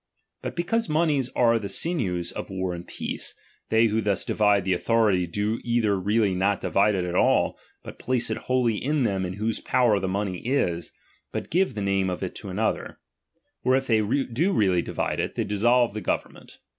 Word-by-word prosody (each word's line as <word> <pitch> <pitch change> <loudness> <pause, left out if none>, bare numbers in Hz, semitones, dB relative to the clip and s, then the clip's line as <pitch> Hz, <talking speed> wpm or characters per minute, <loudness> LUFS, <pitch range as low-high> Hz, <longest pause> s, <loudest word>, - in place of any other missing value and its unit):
But - - -5
because 200 +5 0
monies 150 -5 +1
are 115 -1 +4
the 100 -2 -5
sinews 95 - -1
of - - -6
war 95 -1 -2
and 85 0 -8
peace, - - -3 0.3
they 110 +1 +4
who 110 0 +1
thus 100 -2 0
divide 105 -3 +2
the 95 - +2
authority, 100 -2 +2
do 105 +6 -1
either 115 -4 +1
really 100 +1 +1
not 100 +2 +1
divide 100 +1 +2
it 90 -2 -1
at 90 - -3
all, - - +3 0.3
but - - -10
place 125 -2 0
it - - -1
wholly 125 -4 +1
in 145 +1 +1
them 95 -4 0
in 90 - -4
whose 110 +3 -2
power 120 -5 +2
the 95 - -2
money 95 -1 -2
is, 90 - -1 0.4
but - - -5
give 185 - +1
the 105 - -3
name 95 -1 +1
of 90 +1 -4
it 95 - -4
to 100 - -8
another: 105 +4 -2 0.7
or 130 +1 +3
if 135 0 0
they 115 -4 +3
do 135 - 0
really 95 - +3
divide - - -2
it, - - -2
they - - 0
dissolve 120 +3 +2
the 110 - -4
government. - - -4
105 Hz, 195 wpm, -25 LUFS, 95-120 Hz, 0.7 s, are